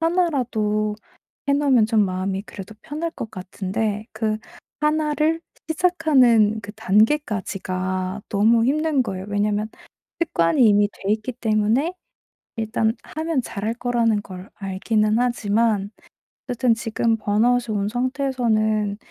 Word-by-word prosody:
하나라도 245 -12 0 0.5
해 - - +4
놓으면 265 -6 +3
좀 220 -3 +3
마음이 190 +1 -2
그래도 200 0 -10
편할 320 +3 -4
것 225 - -6
같은데 200 +3 -3
그 215 -1 -1 0.4
하나를 305 +1 +1 0.3
시작하는 270 - +3
그 205 0 -8
단계까지가 195 -4 0
너무 225 +3 +3
힘든 300 -1 +2
거예요. 190 -3 -5
왜냐하면 205 +1 0 0.5
습관이 225 - +3
이미 205 0 +4
돼 200 +2 -2
있기 220 +3 -2
때문에 230 - +1 0.6
일단 220 0 0
하면 315 -3 -2
잘할 220 0 -3
거라는 235 -3 +1
걸 185 -1 -10
알기는 215 +3 0
하지만 220 -3 +1 0.6
어쨌든 245 -1 +2
지금 225 0 0
번아웃이 225 +2 +1
온 200 +1 -1
상태에서는 235 -5 0
220 Hz, 275 characters per minute, -22 LUFS, 205-255 Hz, 0.6 s, 해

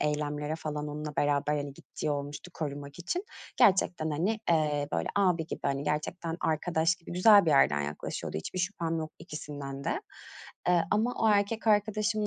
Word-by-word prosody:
eylemlere 150 0 -1
falan 150 -2 -4
onunla 150 0 -5
beraber, 145 +1 +2
hani, 145 -1 -3
gittiği 150 +2 -5
olmuştu, 145 +4 -4
korumak 145 -1 -5
için. 350 - -2 0.3
Gerçekten, 180 -4 +3
hani, 190 +9 0
eee, 150 -3 +2
böyle - - 0
abi 180 -5 +2
gibi, - - -6
hani, 140 0 0
gerçekten 160 +3 -2
arkadaş 160 +1 +1
gibi 175 -2 -11
güzel 200 +2 +7
bir - - +4
yerden 75 - +4
yaklaşıyordu. 75 +1 -4
Hiçbir 80 - -5
şüphem 175 -3 -1
yok 155 -1 -5
ikisinden 145 -2 -7
de, - - -1 0.7
eee, 175 -2 +4
ama 225 +4 +2
o 220 - +5
erkek 210 +2 +2
arkadaşımın 215 0 +2
155 Hz, 160 wpm, -30 LUFS, 145-185 Hz, 0.7 s, güzel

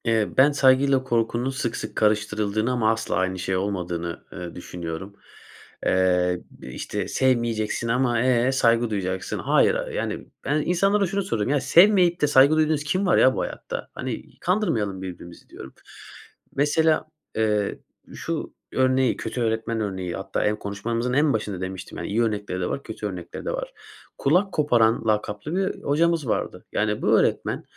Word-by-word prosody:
Eee, 115 -3 +2
ben 140 +3 +6
saygıyla 135 -1 +4
korkunun 120 0 0
sık 135 -3 -3
sık 110 - -6
karıştırıldığını 105 +1 +1
ama 115 -3 +2
asla 110 0 -2
aynı 95 +1 -1
şey 95 +1 -1
olmadığını, 90 -3 -3
eee, 90 -1 -7
düşünüyorum. 90 +2 -7 0.7
Eee, 90 -1 +2
bir - - -13
işte 105 -3 -4
sevmeyeceksin 115 -3 0
ama, 120 -1 +1
eee, 125 0 +3
saygı 120 -3 +2
duyacaksın. 95 -3 -3
Hayır. - - +3 0.2
Yani, - - -4 0.2
ben 150 +2 +1
insanlara 195 +4 +2
şunu 195 +2 -1
sorayım. 115 - -1
Ya 145 0 +2
sevmeyip 180 -1 +5
de 150 - +4
saygı 140 +1 +6
duyduğunuz 155 -1 +2
kim 185 +6 0
var 180 - +3
ya 130 - +5
bu - - -1
hayatta? - - -5
Hani - - -6
kandırmayalım 115 - 0
birbirimizi 85 -2 -9
diyorum. 65 - -11 0.8
Mesela, 155 +3 +2 0.3
eee, 105 -2 0 0.4
şu - - -4 0.2
örneği, 130 -1 +2
kötü 120 +2 -4
öğretmen 115 0 -1
örneği 95 -4 -3
hatta - - -2
en 105 - +2
konuşmamızın 115 +5 -3
en 145 +2 +3
başında 105 -4 -3
demiştim 95 0 -6
yani - - -4
iyi 110 +4 +1
örnekleri 105 -4 -2
de 90 - -1
var, 140 - -4
kötü 110 -1 -5
örnekleri 90 -4 -7
de - - -1
var. - - -5 0.4
Kulak 180 +8 +2
koparan 120 -7 +2
lakaplı 105 - -1
bir 190 0 -2
hocamız 160 0 +1
vardı. - - -2
Yani, - - 0
bu - - +4
öğretmen - - 0
115 Hz, 160 wpm, -24 LUFS, 100-140 Hz, 0.8 s, ben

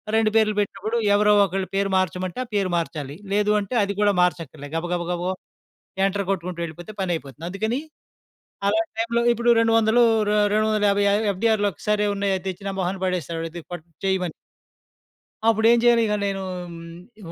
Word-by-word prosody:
2 220 -1 +3
పేర్లు 215 -1 +3
పెట్టినప్పుడు 215 +3 -2 0.2
ఎవరో 210 0 +4
ఒకళ్ళ 195 0 -1
పేరు 195 0 +1
మార్చమంటే 185 +2 -2
ఆ - - -20
పేరు 195 -2 +1
మార్చాలి. 150 -4 -4 0.2
లేదు 210 0 +2
అంటే 205 +4 -4
అది 200 0 -2
కూడా 205 0 +4
మార్చక్కర్లే. 160 -5 -1
గబగబగబా 175 +1 -2 0.8
ఎంటర్ 200 +1 0
కొట్టుకుంటూ 180 -2 -3
వెళ్ళిపోతే 170 +4 -7
పని 185 -2 -1
అయిపోతుంది. 145 0 -8
అందుకని 220 +7 -2 0.9
అలాంటి 330 +10 +1
టైమ్‌లో 235 +1 +1
ఇప్పుడు 235 +1 +1
200 225 +1 +4 0.3
రే 210 - +2 0.2
రెండు 215 0 +2
వందల 215 -1 +1
యాబై 200 0 +2
య - - +3 0.2
ఎఫ్‌డి‌ఆర్‌‌లు 205 +1 +1
ఒక్కసారె 210 +6 0
ఉన్నాయి. 200 0 0
అవి 185 - -8
తెచ్చి 190 +1 -6
నా - - -2
మొహాన 185 +1 -1
పడేస్తాడు 170 -3 -2
ఇది 170 - -7
పట్ 175 -3 -6 0.2
చేయమని. 190 -3 0 1.1
అప్పుడేం 225 +1 +5
చేయను 240 -1 +5
ఇక 210 - 0
నేను 195 -1 -2 0.3
హ్మ్. 170 +5 -12
195 Hz, 165 wpm, -23 LUFS, 175-215 Hz, 1.1 s, అప్పుడేం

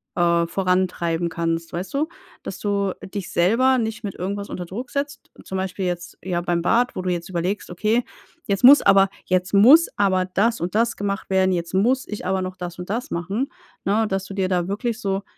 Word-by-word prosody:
äh, 170 -1 +3
vorantreiben 180 -2 0
kannst, 165 0 -2
weißt 180 +2 -5
du? 290 +3 0 0.4
Dass - - -6
du 200 -2 0 0.2
dich 200 -4 -4
selber 235 +9 +3
nicht 225 0 -3
mit 200 -3 -5
irgendwas 200 +3 -4
unter 180 - -5
Druck 235 +9 -6
setzt. 285 0 -4
Zum 190 - -4
Beispiel 190 0 -3
jetzt 175 -1 -4
ja, 175 -1 -1
beim 175 -1 0
Bad, 240 +7 +2
wo - - -3
du 185 - -1
jetzt 175 +1 -3
überlegst: 185 +3 -2
„Okay, 215 +7 +1 0.4
jetzt 200 0 -1
muss, 280 +4 +9
aber 195 0 +5 0.2
jetzt 185 +1 0
muss 260 +12 +7
aber 190 -2 +2
das 210 +6 +1
und 175 +3 -3
das 230 +1 +1
gemacht 200 -1 -3
werden. 190 0 +3
Jetzt 170 0 -3
muss 245 +8 +2
ich 210 -3 -6
aber 190 +1 0
noch 185 0 -5
das 180 -1 -7
und 180 - -7
das 235 +5 -3
machen,“ 195 +10 -2 0.4
ne, 215 +3 +2
dass 195 0 -2
du 200 - -8
dir 190 -2 0
da 180 -2 0
wirklich 220 +4 -2
so 195 -1 -1
190 Hz, 205 wpm, -22 LUFS, 180-215 Hz, 0.4 s, muss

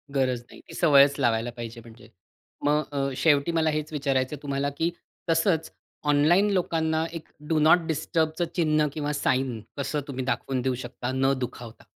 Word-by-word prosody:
गरज 130 -3 +1
नाही. - - -14
ती - - -12
सवयच 140 -4 +5
लावायला 120 -2 +1
पाहिजे 115 -1 -7
म्हणजे. 110 -1 -15 0.6
मग 150 +1 +3
अ, 140 -1 0
शेवटी 145 0 +3
मला 160 -1 +2
हेच 155 0 -2
विचारायचं 135 -1 0
आहे 145 - -15
तुम्हाला, 140 0 -1
की 160 +4 -1 0.4
तसंच 165 0 +1 0.4
ऑनलाईन 160 +8 +4
लोकांना 160 -3 0
एक 165 -2 -7 0.2
डु 160 - +2
नॉट 155 +4 +6
डिस्टर्बच 160 +1 -1
चिन्ह 155 -3 +2
किंवा 150 -1 -2
साइन 130 -4 0 0.2
कसं 145 +1 -2
तुम्ही 130 -2 -4
दाखवून 130 0 -1
देऊ 130 0 0
शकता 125 +1 -5
न 135 +1 +2
दुखावता. 120 -2 -7
145 Hz, 165 wpm, -26 LUFS, 130-160 Hz, 0.6 s, नॉट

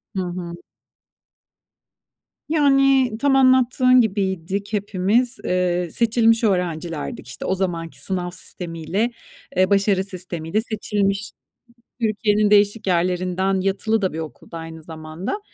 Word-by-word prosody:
Hı 190 - 0
hı. 175 -1 -5 2.0
Yani, 275 -4 +4
tam 280 0 +3
anlattığın 255 -1 +5
gibiydik 195 -1 -2
hepimiz. 210 +5 +1
Eee, 180 -1 0
seçilmiş 230 +1 +3
öğrencilerdik, 175 - -2
işte. - - -7
O 190 - +1
zamanki 170 -3 -3
sınav 180 -2 -2
sistemiyle, 175 +5 -3 0.5
eee, 185 0 +4
başarı 200 -1 +3
sistemiyle 180 0 -2
seçilmiş, 205 -2 -2 0.7
Türkiye'nin 215 -1 +2
değişik 205 +1 +3
yerlerinden, 185 +2 +1
yatılı 200 +3 0
da 185 - 0
bir 160 - -5
okulda 160 +1 -8
aynı 165 0 -9
zamanda. 160 - -6
195 Hz, 110 wpm, -22 LUFS, 175-225 Hz, 2.0 s, anlattığın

